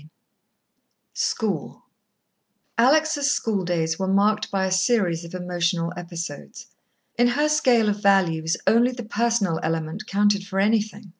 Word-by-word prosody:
II 150 - -17 1.1
School - - -3 0.9
Alex' 300 +5 +3
schooldays 180 - -1
were 190 - -1
marked 210 +2 +1
by 190 -1 -1
a 190 - -2
series 185 -4 +1
of 170 +2 -9
emotional 175 -1 -2
episodes. 170 -1 -8 0.5
In 240 - +5
her 290 +5 +1
scale 255 -7 +3
of 205 0 -1
values, 170 -5 +2
only 240 +3 +3
the 245 -1 -7
personal 220 -6 0
element 165 +5 -3
counted 205 0 +1
for 195 -1 -3
anything. 210 0 0
200 Hz, 130 wpm, -23 LUFS, 175-230 Hz, 1.1 s, In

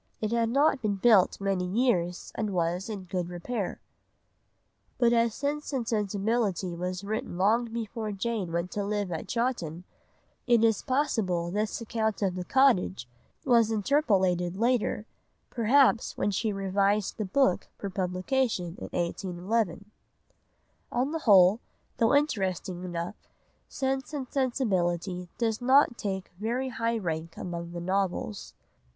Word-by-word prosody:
It 215 0 -2
had 230 -1 +1
not 280 +2 +3
been 210 -3 0
built 200 -2 +4
many 195 -2 0
years 180 -3 0
and 215 - -2
was 175 +4 -1
in 205 -3 -5
good 180 -1 -3
repair." 190 +3 -4 1.2
But 240 -1 +4
as 230 -1 +2
Sense 295 +2 -2
and 245 -4 -1
Sensibility 205 -3 0
was 180 +2 -4
written 200 -4 -4
long 220 +6 +3
before 225 -1 -4
Jane 205 -3 -2
went 170 +2 -2
to 205 - -2
live 205 -2 -2
at 165 - -4
Chawton, 205 -10 -2 0.6
it 235 -2 +4
is 225 -2 +3
possible 215 - 0
this 210 +2 -1
account 220 -2 -1
of 190 -2 +1
the 180 0 -4
cottage 180 - +2 0.4
was 235 -4 +4
interpolated 195 - +1
later, 235 -2 +1 0.5
perhaps 250 +1 +3
when 205 - +1
she 215 +3 0
revised 195 +1 0
the - - +1
book 265 +8 +2
for 200 - -5
publication 185 0 -1
in - - -6
1811. 185 +3 -2 1.0
On 255 +4 0
the 325 - -2
whole, 200 - +6 0.4
though 230 +4 +3
interesting 190 - 0
enough, 175 +2 -5 0.4
Sense 270 +2 -2
and 270 -3 -4
Sensibility 185 - -1
does 225 -1 0
not 260 0 +5
take 190 -2 -3
very 245 +5 -1
high 230 -1 -1
rank 165 -4 -4
among 170 -1 -5
the 175 - -4
novels. 190 +2 -2
205 Hz, 135 wpm, -28 LUFS, 180-235 Hz, 1.2 s, whole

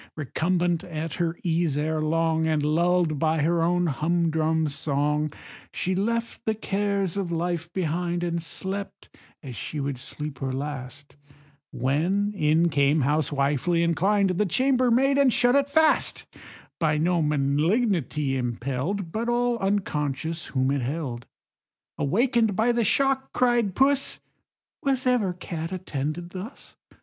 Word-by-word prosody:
Recumbent 170 +3 0
at 160 -4 -5
her 170 0 -1
ease, 165 -4 0
ere 155 +1 -1
long, 160 +1 +1
And 155 -2 +1
lull'd 165 0 +2
by 160 -1 +1
her 170 +2 +2
own 175 +1 +2
humdrum 160 0 +1
song, 150 +1 -1 0.4
She 185 - -1
left 230 +5 -2
the 220 - +1
cares 200 -3 -1
of 190 -4 -2
life 170 0 -2
behind, 175 0 -1
And 170 -1 -1
slept 195 +4 -6 0.3
as 130 -4 -7
she 150 +8 -5
would 140 -2 -3
sleep 150 +1 -6
her 135 -1 -2
last, 140 0 -6 0.6
When 180 +11 0
in 160 -2 +2
came, 145 0 +2
housewifely 145 +3 +1
inclined, 190 +4 +2
The 185 +4 +1
chambermaid, 260 - +3
and 275 -2 +5
shut 245 +1 +4
it 280 0 +2
fast; 315 +2 +2 0.5
By 155 -2 +2
no 170 +2 +1
malignity 150 - +1
impell'd, 135 - -3
But 230 +4 -2
all 240 0 +1
unconscious 160 -6 -2
whom 130 0 0
it 140 -1 0
held. 125 -3 -4 0.7
Awaken'd 225 - +2
by 225 +5 +3
the 235 -1 +1
shock 270 +4 +1
(cried 240 -6 +2
Puss) 275 +1 +2 0.6
"Was 265 -2 0
ever 245 -7 +2
cat 170 -2 -6
attended 170 -1 -4
thus? 190 +8 -9
170 Hz, 135 wpm, -25 LUFS, 150-200 Hz, 0.7 s, and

